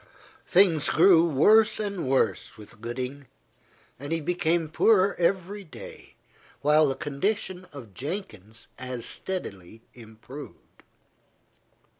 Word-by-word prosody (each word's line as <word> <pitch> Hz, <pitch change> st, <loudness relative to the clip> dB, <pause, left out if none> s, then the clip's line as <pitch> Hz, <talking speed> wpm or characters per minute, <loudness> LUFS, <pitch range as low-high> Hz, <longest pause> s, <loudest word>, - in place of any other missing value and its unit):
Things 175 Hz, -5 st, +4 dB
grew 170 Hz, 0 st, +5 dB
worse 215 Hz, -, +4 dB
and 200 Hz, -8 st, -3 dB
worse 130 Hz, -3 st, 0 dB
with 105 Hz, 0 st, -14 dB
Gooding, 130 Hz, +4 st, -5 dB, 0.7 s
and 145 Hz, +3 st, -7 dB
he 165 Hz, -, +1 dB
became 170 Hz, 0 st, 0 dB
poorer 195 Hz, +4 st, +3 dB
every 190 Hz, +3 st, -1 dB
day, 160 Hz, -, -12 dB, 0.5 s
while 150 Hz, +1 st, +4 dB
the 135 Hz, -, -1 dB
condition 185 Hz, +6 st, -3 dB
of 125 Hz, -9 st, -11 dB
Jenkins 115 Hz, -, -7 dB
as 125 Hz, -2 st, -5 dB
steadily 110 Hz, -, -6 dB
improved. 120 Hz, +5 st, -13 dB
155 Hz, 105 wpm, -26 LUFS, 125-185 Hz, 0.7 s, grew